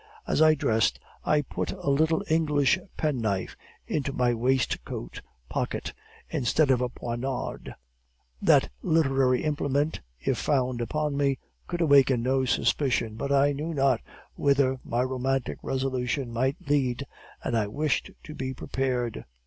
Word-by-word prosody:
As - - +1
I 155 0 +7
dressed 110 -6 +1 0.2
I 150 -1 +2
put - - -3
a 140 - -2
little 160 +3 +2
English 155 0 +3 0.2
penknife 115 - -1 0.3
into 140 -2 -1
my 125 -2 +1
waistcoat 120 - -1 0.3
pocket, - - -3 0.3
instead 135 +3 +2
of 125 -1 +3
a 125 - 0
poniard. 120 +2 -4 0.7
That - - +4
literary 135 -5 +2
implement, 145 0 0 0.2
if - - -1
found 130 -4 0
upon 150 +4 -1
me, 140 -2 +2 0.3
could 175 0 -3
awaken 135 -6 +5
no 130 +1 +2
suspicion, 125 -4 +1
but 140 +5 -3
I 140 +1 +4
knew 155 +3 -3
not 135 -4 +2 0.3
whither 135 -2 +2
my 120 +2 0
romantic 130 0 -1
resolution 130 -1 -2
might 130 +5 0
lead, 140 -2 +1 0.4
and 120 - -1
I 110 -2 +1
wished 145 +8 -1
to 155 - -9
be 130 -2 -4
prepared. 125 -3 -2
135 Hz, 135 wpm, -27 LUFS, 125-145 Hz, 0.7 s, I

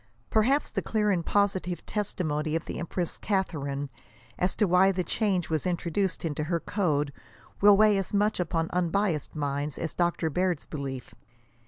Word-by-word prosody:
Perhaps 255 +7 +2
the - - -1
clear 210 -1 +1
and 175 -3 +1
positive 190 -2 0
testimony 155 -7 -2
of 165 - -2
the - - -5
empress 170 0 -3
Catharine, 145 -8 -2 0.5
as 180 +1 +1
to 210 - +3
why 185 +2 +5
the 185 -1 -1
change 190 -1 0
was 160 +3 0
introduced 175 +1 -1
into 150 -1 -2
her 170 +1 0
code, 150 -7 0 0.5
will 205 0 +8
weigh 210 -1 +5
as 195 - -4
much 210 +1 +1
upon 165 -2 0
unbiassed 180 -3 0
minds, 145 0 -2
as 165 - -3
Dr. 170 -2 0
Baird's 180 -1 0
belief. 135 -4 -6
175 Hz, 160 wpm, -28 LUFS, 155-200 Hz, 0.5 s, will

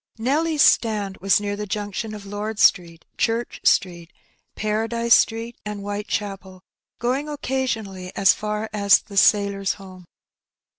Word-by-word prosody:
Nelly's 295 +6 +1
stand 205 -4 +2
was 195 +1 +3
near 205 0 -3
the 210 0 -6
junction 210 +2 -4
of 205 -1 -10
Lord 205 +2 -5
Street, 170 -5 +2
Church 230 +1 -1
Street, 175 -2 +1 0.4
Paradise 225 +2 0
Street, 225 +2 +1
and 210 -1 -6
Whitechapel, 200 -2 -5 0.3
going 265 +5 -1
occasionally 225 -10 -3
as 195 0 +5
far 210 +1 -4
as 200 -2 +5
the 210 - -15
^' - - -4
Sailor's 200 -2 +2
Home." 185 -2 -13
210 Hz, 135 wpm, -22 LUFS, 195-225 Hz, 0.4 s, as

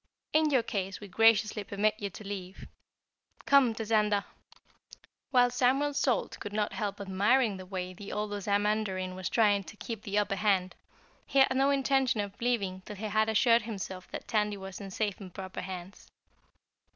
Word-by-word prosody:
In 310 0 +4
your 260 -5 +3
case 195 -4 -3
we 205 - -9
graciously 215 +1 +3
permit 210 +1 +1
you 200 - -3
to 195 +2 -10
leave. 190 -2 -7 0.8
Come, 270 -5 +5
Tazander!" 210 -2 +1 1.1
While 245 -3 +4
Samuel 265 +4 +2
Salt 260 -4 0
could 205 - -6
not 210 -1 -1
help 205 -3 -3
admiring 200 +3 +2
the 185 -1 -10
way 185 -1 -4
the 200 +2 -9
old 210 0 -2
Ozamandarin 205 -2 0
was 185 -1 -4
trying 205 -3 +3
to 220 - -11
keep 225 -1 -6
the 205 -1 -3
upper 205 -1 +1
hand, 185 -3 +1 0.5
he - - -2
had 265 -1 +5
no 270 +1 +3
intention 270 -3 +2
of 205 -1 -3
leaving 200 -6 0
till 210 - -9
he 210 +3 -6
had 215 +1 +1
assured 230 +2 +4
himself 190 -4 -6
that - - -7
Tandy 210 -2 0
was 195 +1 -8
in 195 - -7
safe 205 +1 -2
and 185 -2 -9
proper 185 +1 -6
hands. 185 +1 -8
210 Hz, 175 wpm, -30 LUFS, 195-230 Hz, 1.1 s, Come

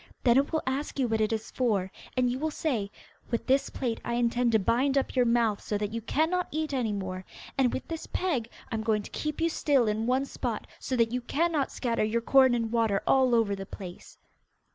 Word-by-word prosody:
Then 240 -2 +5
it 280 +1 +2
will 315 - 0
ask 270 +4 -2
you 260 -3 +2
what 220 -1 0
it 215 - +1
is 220 0 -3
for, 205 -7 0 0.3
and 250 -1 +3
you 245 +1 -1
will 315 +2 0
say, 250 -10 -1 0.4
'With 235 - -1
this 270 +1 +2
plait 235 -4 -3
I 235 - -2
intend 240 0 +2
to - - +7
bind 255 +7 +2
up 275 - 0
your 250 -2 +4
mouth 230 -3 +2
so 210 - -2
that 205 +1 -3
you 230 - -2
cannot 320 +10 0
eat 310 -1 -2
any 245 -5 0
more, 185 -2 -4 0.3
and 260 -3 +3
with - - -4
this 325 -1 -5
peg 270 -12 -1 0.2
I - - -3
am 220 - -1
going 215 -1 +1
to - - -10
keep 305 -1 -3
you 330 - +3
still 285 -6 +2
in 215 +2 0
one 260 +2 +2
spot, - - -4
so 260 - -2
that 230 -2 +2
you 250 +1 -1
cannot 300 +2 0
scatter 235 -4 -1
your 220 +2 0
corn 260 +1 +5
and 230 -2 -1
water 225 -4 +1
all 260 -2 +4
over 220 -3 +2
the 195 0 -7
place! 180 -3 -10
240 Hz, 230 wpm, -28 LUFS, 220-270 Hz, 0.4 s, to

